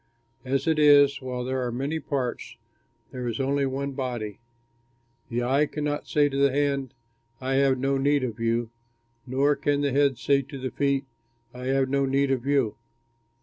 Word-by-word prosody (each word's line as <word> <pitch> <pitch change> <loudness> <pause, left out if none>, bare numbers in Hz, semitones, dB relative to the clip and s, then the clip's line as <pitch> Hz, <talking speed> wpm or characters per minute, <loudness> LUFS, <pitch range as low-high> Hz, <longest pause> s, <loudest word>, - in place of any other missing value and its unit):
As 135 +1 -1
it 160 -1 +2
is, 145 -2 +6
while 125 -1 -4
there 130 +1 -2
are 120 - -2
many 140 +6 -2
parts, 130 -6 -4 0.5
there 125 -2 -5
is 115 -2 -3
only 140 +1 +1
one 140 +1 -3
body. 120 -6 -4 0.9
The 120 +1 -1
eye 135 +4 +2
cannot 145 0 -3
say 145 -1 +3
to 135 -1 -4
the 140 0 +4
hand, 140 -2 -1 0.4
"I 130 +1 -2
have 135 -1 +3
no 135 +1 0
need 140 0 +2
of 115 -3 -4
you," 115 0 0 0.6
nor 140 +3 +2
can 145 0 0
the 140 -1 +1
head 140 -1 +2
say 140 +2 +2
to 140 +1 -9
the 130 -1 -4
feet, 140 -1 0 0.5
"I 125 0 -8
have 135 0 +1
no 140 0 +1
need 135 +1 +1
of 130 0 -1
you." 135 -7 +1
135 Hz, 180 wpm, -26 LUFS, 125-140 Hz, 0.9 s, is